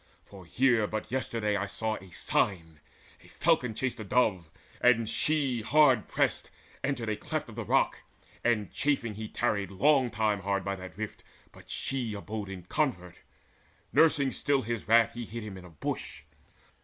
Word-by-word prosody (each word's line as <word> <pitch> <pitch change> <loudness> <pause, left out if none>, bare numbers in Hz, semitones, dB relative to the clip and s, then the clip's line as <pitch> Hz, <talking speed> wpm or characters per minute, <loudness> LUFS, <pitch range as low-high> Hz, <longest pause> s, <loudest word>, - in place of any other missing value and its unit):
For 95 -4 -13
here 120 -1 +3
but 110 +1 -4
yesterday 115 -5 -1
I 100 0 -1
saw 110 +2 -2
a 95 - -13
sign: 80 -4 -1 0.4
A - - -17
falcon 120 -3 +1
chased 125 0 -2
a - - -4
dove, 100 -6 +1 0.3
and 115 -2 +4
she, 140 -3 +1
hard 130 -2 +4
pressed, - - 0 0.3
Entered 130 -4 -1
a 110 - 0
cleft - - -4
of - - -10
the - - -4
rock; - - +2 0.4
and 105 -5 +1
chafing 135 -6 0
he 110 +1 -6
Tarried 100 -1 -1
long 130 +6 +3
time 110 -2 0
hard 100 0 -1
by 100 0 -1
that 95 -2 -10
rift, 110 -1 -6 0.3
but - - -17
she 125 -5 -2
Abode 105 0 -5
in 95 -2 -7
covert. 90 - -1 0.8
Nursing 145 -4 +4
still 140 -2 +1
his 115 -2 -4
wrath, 115 0 +5
He 120 - -5
hid 115 +1 -6
him 105 -2 -7
in 90 -1 -10
a - - -12
bush. 80 - -5
110 Hz, 170 wpm, -29 LUFS, 100-125 Hz, 0.8 s, wrath